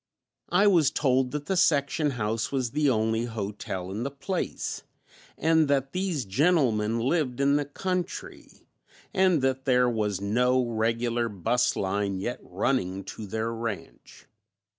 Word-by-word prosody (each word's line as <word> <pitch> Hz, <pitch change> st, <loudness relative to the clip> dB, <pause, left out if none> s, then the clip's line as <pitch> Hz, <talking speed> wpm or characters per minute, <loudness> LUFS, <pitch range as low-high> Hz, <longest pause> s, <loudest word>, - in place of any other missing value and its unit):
I 190 Hz, +4 st, +4 dB
was 170 Hz, -8 st, +5 dB
told 130 Hz, -3 st, +1 dB
that 145 Hz, +2 st, -4 dB
the 190 Hz, -, -1 dB
section 150 Hz, -3 st, +2 dB
house 115 Hz, -3 st, -2 dB
was 130 Hz, -4 st, -1 dB
the 150 Hz, +1 st, +2 dB
only 110 Hz, -1 st, +1 dB
hotel 100 Hz, -4 st, -5 dB
in 105 Hz, +4 st, -4 dB
the 135 Hz, -, -2 dB
place 165 Hz, +6 st, -4 dB, 0.6 s
and 160 Hz, 0 st, +3 dB
that 135 Hz, -1 st, +1 dB
these 180 Hz, -, -1 dB
gentlemen 115 Hz, -, +2 dB
lived 130 Hz, 0 st, 0 dB
in 140 Hz, +1 st, +3 dB
the 145 Hz, 0 st, +1 dB
country 180 Hz, +5 st, -5 dB, 0.5 s
and 185 Hz, -7 st, +3 dB
that 130 Hz, 0 st, 0 dB
there 125 Hz, -1 st, +4 dB
was 105 Hz, -5 st, -1 dB
no 125 Hz, +5 st, +2 dB
regular 115 Hz, +1 st, 0 dB
bus 115 Hz, +5 st, +1 dB
line 100 Hz, 0 st, -1 dB
yet 120 Hz, +6 st, -3 dB
running 95 Hz, -1 st, -1 dB
to 110 Hz, -, -8 dB
their 110 Hz, +3 st, -2 dB
ranch. 115 Hz, -3 st, -7 dB
125 Hz, 140 wpm, -27 LUFS, 110-145 Hz, 0.6 s, was